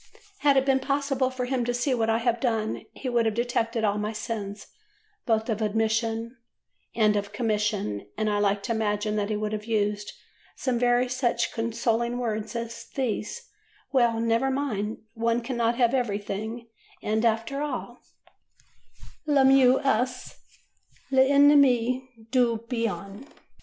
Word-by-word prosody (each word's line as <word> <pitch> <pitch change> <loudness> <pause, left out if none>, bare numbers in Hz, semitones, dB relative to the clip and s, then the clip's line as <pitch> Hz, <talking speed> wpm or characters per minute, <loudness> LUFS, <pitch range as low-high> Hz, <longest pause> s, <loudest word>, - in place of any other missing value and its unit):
Had 285 -2 +4
it 265 - +3
been 270 -1 +3
possible 275 -1 0
for 255 -1 -3
him 250 -1 -1
to 245 +1 -1
see 250 +2 0
what 225 -2 0
I 225 - +3
have 235 0 0
done, 225 -3 -1
he 270 - -7
would 235 -2 +2
have 220 - -1
detected 230 -1 -1
all 205 -1 +1
my 210 +1 -2
sins, 210 -2 -5 0.6
both 220 -1 +1
of 225 -2 -2
omission 225 +2 0 0.6
and 215 -2 +3
of 200 0 -2
commission, 210 - -1
and 215 - 0
I 205 -1 +1
like 200 0 +1
to 235 - -3
imagine 210 -1 0
that 205 0 -1
he 215 - 0
would 210 0 -2
have 210 0 -4
used 210 -2 -1 0.4
some 250 -3 -1 0.3
such 245 -2 0
consoling 230 +1 -1
words 220 -2 -3
as 230 0 -5
these: 265 - -3 0.4
"Well, 235 -4 +3
never 230 +3 +1
mind; 225 -7 -2
one 230 0 +1
cannot 235 -1 0
have 240 -1 +3
everything; 220 -1 -2 0.4
and, 220 +1 0
after 230 +5 0
all, 255 -4 -4 1.3
'Le 285 -3 +4
mieux 265 -1 +6
est 255 -1 0 0.8
l'ennemi 265 -2 +4 0.2
du 245 -3 +3
bien. 225 0 -4
230 Hz, 145 wpm, -26 LUFS, 215-255 Hz, 1.3 s, mieux